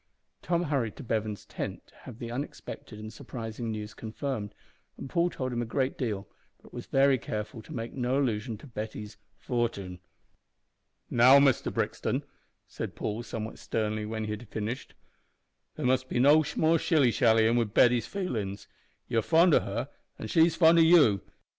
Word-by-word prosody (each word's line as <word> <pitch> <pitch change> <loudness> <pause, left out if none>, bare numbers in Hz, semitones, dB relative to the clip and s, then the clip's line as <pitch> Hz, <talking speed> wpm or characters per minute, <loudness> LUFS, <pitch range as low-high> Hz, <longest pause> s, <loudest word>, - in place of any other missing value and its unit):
Tom 175 0 0
hurried 135 -9 -1
to - - -9
Bevan's 110 -3 -2
tent - - -6
to - - -25
have 125 -4 -11
the 120 -1 -6
unexpected 120 -3 -7
and 110 +1 -8
surprising 115 0 -6
news 105 -1 -5
confirmed, 110 -2 -5 0.4
and - - -7
Paul 170 +5 +1
told 130 -6 -4
him 120 - -1
a - - -2
good 130 +3 -1
deal, 105 -6 -3 0.3
but - - -19
was - - -7
very 135 -1 +4
careful 110 +1 -5
to - - -14
make 115 0 -5
no 125 0 0
allusion 115 -4 -1
to 110 - -14
Betty's 110 -4 -7 0.2
"fortin." 105 -8 -3 1.1
"Now, 125 +3 +7
Mister 140 -3 +3
Brixton," - - -2 0.4
said - - -6
Paul, 105 +3 -3
somewhat 115 -2 -6
sternly, 110 -1 -2
when 110 0 -3
he 105 - -3
had 105 +1 -7
finished, 110 +5 -5 0.8
"there - - -4
must 130 0 +1
be - - -2
no 145 +5 +6
more 160 +1 +3
shilly 145 -8 +3
shallyin' 115 -1 +4
wi' 120 -1 +3
Betty's 120 +3 +3
feelin's. 110 - -4 0.4
You're 115 - +1
fond 165 - +4
o' - - +7
her, - - -4 0.3
an' 110 - -6
she's 165 +4 +4
fond 165 0 +6
o' - - +7
you. 160 - +6
120 Hz, 170 wpm, -29 LUFS, 110-135 Hz, 1.1 s, Now